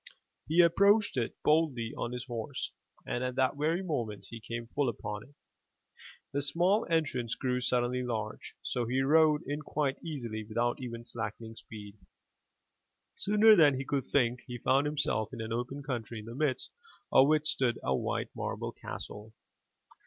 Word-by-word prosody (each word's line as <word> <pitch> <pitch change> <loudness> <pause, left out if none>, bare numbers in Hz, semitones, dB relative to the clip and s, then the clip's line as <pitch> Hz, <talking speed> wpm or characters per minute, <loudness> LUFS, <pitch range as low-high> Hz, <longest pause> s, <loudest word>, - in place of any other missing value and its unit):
He 165 +4 +5
approached 200 +5 +4
it 120 -3 -1
boldly 150 -8 +2
on 120 - -3
his 125 0 -4
horse 120 +2 -4 0.3
and 120 - -2
at 125 0 -2
the 130 0 +3
very 160 +6 0
moment 115 - -3
he 115 - -7
came 115 +2 -5
full 135 +3 0
upon 105 -2 -5
it, 140 +5 -17 1.0
the 140 - +1
small 175 +9 +2
entrance 140 -8 0
grew 125 -1 -1
suddenly 125 0 +1
large, 110 -3 -4
so 120 -2 -1
he 130 +3 +1
rode 155 +1 +4
in 145 +2 -3
quite 145 -2 -1
easily 120 -9 -4
without 120 +4 -1
even 120 -2 -6
slackening 115 -1 -5
speed. 105 -2 -11 1.1
Sooner 210 +2 +6
than 150 -6 +6
he 135 +1 -3
could 140 -2 -1
think, 125 -3 +2
he 125 -1 -5
found 135 +4 +2
himself 145 -7 0
in - - -6
an 110 0 -3
open 125 +4 -3
country 120 -4 -4
in 105 - -7
the 115 - -7
midst 140 0 -1 0.4
of 135 - +7
which 155 0 +3
stood 130 -6 +1
a 65 - +1
white - - -2
marble - - -3
castle. 105 +1 -8
125 Hz, 165 wpm, -31 LUFS, 115-150 Hz, 1.1 s, of